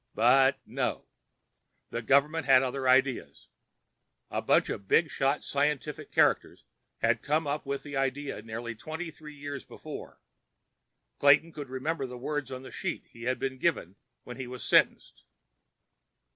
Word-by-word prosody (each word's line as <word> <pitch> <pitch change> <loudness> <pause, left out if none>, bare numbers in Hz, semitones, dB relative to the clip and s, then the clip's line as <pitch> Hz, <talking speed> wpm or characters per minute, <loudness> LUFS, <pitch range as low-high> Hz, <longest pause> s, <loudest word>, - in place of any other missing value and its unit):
But 130 +3 +5
no—the 115 - -7
government 140 +5 +2
had 130 -1 +7
other 130 0 -1
ideas. 130 0 +1 0.8
A - - -1
bunch - - +3
of 100 - -5
bigshot 140 - +2
scientific 145 0 -1
characters - - +2 0.4
had 115 0 +3
come 155 +2 +1
up 145 0 -3
with 140 0 -3
the 145 -1 -7
idea 135 -3 -2
nearly 115 +2 -5
twenty 160 +8 -6
three 150 0 -12
years 145 -3 -6
before. - - -9 1.0
Clayton 145 +4 +5
could 145 -4 -8
remember 135 +2 -2
the 125 0 -8
words 145 +1 -3
on 130 0 -6
the - - -10
sheet - - -4
he 115 0 -10
had 130 +1 +1
been 130 -1 -3
given 125 - 0 0.3
when 125 -1 -9
he 130 -2 -5
was 125 0 -7
sentenced. - - +2
135 Hz, 145 wpm, -29 LUFS, 125-145 Hz, 1.0 s, had